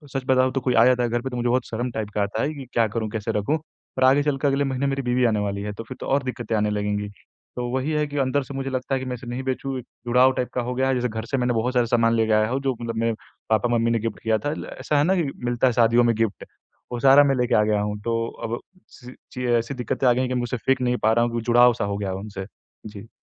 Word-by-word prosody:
सच 135 - -1
बताऊँ, 130 -1 +3
तो 135 - -1
कोई 125 0 0
आ 115 - +6
जाता 125 -1 +3
है 120 - 0
घर 120 +1 -1
पे, 130 - -4
तो 125 - -6
मुझे 120 0 0
बहुत 125 +2 +1
शर्म 120 +2 -3
टाइप 110 -2 -4
का 105 - +1
आता 100 +2 -2
है 155 - -1
कि, 140 -3 -8
"क्या 115 -1 +3
करूँ, 110 -2 -1
कैसे 105 -1 -3
रखूँ?" 145 +10 0 0.4
पर 130 - +2
आगे 135 +2 +5
चलकर 145 -1 0
अगले 140 +1 +2
महीने 135 0 -1
मेरी 140 0 -1
बीवी 125 0 +1
आने 110 -3 +2
वाली 100 -1 -2
है, 105 0 -4
तो 110 - -7
फिर 115 - -9
तो - - -6
और 140 +1 +1
दिक्कतें 120 -3 -3
आने 105 0 +1
लगेंगी। 105 0 -2 0.5
तो 125 - -3
वही 130 +4 -1
है 150 -1 +1
कि 145 0 -6
अंदर 135 +1 +1
से 140 +2 -9
मुझे 135 0 -3
लगता 130 +1 -3
है - - -1
कि 130 - -6
मैं 125 -1 -3
इसे 125 +1 -11
नहीं 125 +2 -4
बेचूँ, 130 0 -3
एक 125 - -6
टाइप - - -56
जुड़ाव 125 +2 +5 0.2
का 125 - 0
हो 125 +1 -3
गया 130 +1 +1
है, 135 - +2
जैसे 125 0 0
घर 110 -1 -5
से 135 +3 -2
मैंने 125 -1 +1
बहुत 115 +3 0
सारा 125 -2 +3
सामान 115 0 +2
लेके 110 -1 +1
आया 110 0 +3
हूँ, 130 +3 -1
जो 135 -2 -1
मतलब 115 -1 -4
मेरे 115 0 +1 0.4
पापा-मम्मी 115 +1 +2
ने 115 - +1
गिफ़्ट 115 0 -4
किया 110 -1 +2
था। 145 - +1
ल - - -6
ऐसा 150 - 0
है 145 - +4
ना 185 +5 +2
कि 165 -6 0 0.2
मिलता 120 +1 +2
है 125 - +2
शादियों 120 0 +4
में 115 -2 +2
गिफ़्ट 110 -2 -2 0.5
वो 120 - -3
सारा 135 +2 +7
मैं 140 -1 +2
लेके 125 -1 +1
आ 105 - +4
गया 105 -1 +1
हूँ। 105 0 -3
तो 115 - 0 0.3
अब 115 +1 -3 0.3
सी 125 -1 -13 0.2
ची 125 0 -4
अ, 120 -1 +3
ऐसी 115 +4 -3
दिक्कतें 125 +1 -1
आ 125 - +6
गई 120 - -1
हैं 130 - -1
कि - - -1
मैं 125 - 0
उसे 120 +1 -3
फेंक 130 +2 0
नहीं 125 0 +1
पा 110 - +4
रहा 120 +1 +3
हूँ, 120 0 -2
जुड़ाव-सा 120 +1 +4
हो 100 0 -2
गया 100 -2 -3
है 95 - -3
उनसे। 100 -1 -6 0.4
जी। 105 +1 -11
120 Hz, 305 wpm, -23 LUFS, 115-130 Hz, 0.5 s, सारा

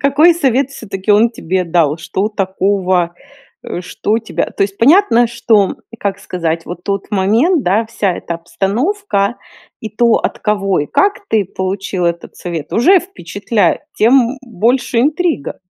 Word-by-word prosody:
Какой 295 +5 +4
совет 275 -4 +1
всё-таки 195 -6 -5
он 225 +3 +4
тебе 185 -4 -2
дал, 165 -3 +1
что 190 +5 -2
такого, 190 -3 0 0.5
э, - - -5
что 210 +4 -1
тебя, 225 - -3
то - - -1
есть, 195 0 -2
понятно, 260 - +5
что 225 -4 +1
и, 230 - -11
как 200 -1 -3
сказать, 165 -4 -3
вот 175 0 -8
тот 200 -1 -3
момент, 230 - +2
да, 210 +5 +1
вся 205 -4 -1
эта 170 - -5
обстановка 205 - -1 0.4
и 220 - -5
то, 235 +2 +2
от - - -1
кого 195 -4 0
и 145 - -3
как 405 - 0
ты 215 -2 +2
получил 190 0 -3
этот 170 0 -4
совет, 165 -4 -6
уже 360 - +5
впечатляет, 210 - -1
тем 245 +2 +3
больше 240 +1 0
интрига. 305 - -1
210 Hz, 155 wpm, -15 LUFS, 185-245 Hz, 0.5 s, понятно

